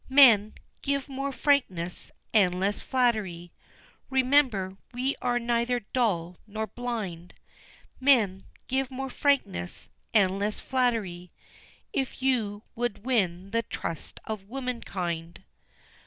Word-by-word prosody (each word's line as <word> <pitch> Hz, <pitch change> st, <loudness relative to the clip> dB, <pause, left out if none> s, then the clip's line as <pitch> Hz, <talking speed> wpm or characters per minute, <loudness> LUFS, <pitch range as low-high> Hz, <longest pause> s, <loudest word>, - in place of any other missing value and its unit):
Men, 235 Hz, -7 st, +7 dB, 0.3 s
give 280 Hz, -1 st, -1 dB
more 275 Hz, 0 st, -3 dB
frankness, 220 Hz, -, +1 dB, 0.2 s
and 185 Hz, -4 st, +4 dB
less 200 Hz, +2 st, 0 dB
flattery, 210 Hz, -9 st, 0 dB, 0.6 s
Remember, 255 Hz, -8 st, +3 dB, 0.2 s
we 260 Hz, +3 st, 0 dB
are 245 Hz, -1 st, +1 dB
neither 240 Hz, +1 st, +1 dB
dull, 180 Hz, -8 st, +1 dB
nor 215 Hz, +1 st, -3 dB
blind, 215 Hz, -7 st, -5 dB, 0.6 s
Men, 230 Hz, -9 st, +4 dB, 0.2 s
give 265 Hz, 0 st, 0 dB
more 265 Hz, 0 st, -4 dB
frankness, 245 Hz, -12 st, 0 dB, 0.2 s
and 195 Hz, -3 st, +3 dB
less 210 Hz, +1 st, -1 dB
flattery, 220 Hz, -9 st, -1 dB, 0.6 s
If 265 Hz, -1 st, -2 dB
you 220 Hz, -6 st, +1 dB
would 235 Hz, -2 st, -3 dB
win 195 Hz, -7 st, 0 dB
the 230 Hz, +1 st, +2 dB
trust 165 Hz, -6 st, -5 dB
of 205 Hz, -2 st, -5 dB
womankind." 185 Hz, -10 st, -4 dB
225 Hz, 110 wpm, -28 LUFS, 190-255 Hz, 0.6 s, Men